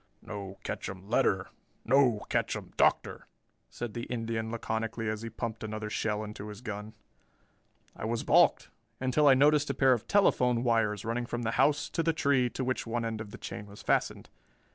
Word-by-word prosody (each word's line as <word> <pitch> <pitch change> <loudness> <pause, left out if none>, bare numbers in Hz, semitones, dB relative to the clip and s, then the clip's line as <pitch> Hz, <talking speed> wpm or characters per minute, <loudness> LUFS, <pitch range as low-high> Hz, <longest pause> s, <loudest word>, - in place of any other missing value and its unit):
"No 100 -2 -7
ketchum 95 0 -5
letter, 100 -7 +2 0.4
no 125 -3 +4
ketchum - - -2
Doctor," - - +1 0.4
said 120 -3 -6
the 120 - -4
Indian 115 -2 -3
laconically 115 0 -3
as 110 0 -2
he 115 - -5
pumped 115 0 -5
another 110 0 -4
shell 105 -1 -1
into 105 0 -7
his 105 0 -9
gun. 110 -2 -6 1.0
I - - -6
was 115 +1 -1
balked, - - +4 0.3
until 130 +3 +2
I 135 - +8
noticed 145 +2 +4
a - - -1
pair 135 -1 +5
of 120 -2 -3
telephone 125 -12 +3
wires 115 -4 +1
running 120 +1 -2
from 120 0 -3
the 115 - 0
house 145 +4 +2
to 165 - 0
the 165 0 +1
tree 140 -5 +2
to 130 - -4
which 130 -1 -2
one 115 0 -1
end 110 -1 -3
of 110 - -7
the - - -9
chain 105 - -7
was 100 0 -12
fastened. - - 0
115 Hz, 185 wpm, -30 LUFS, 105-125 Hz, 1.0 s, I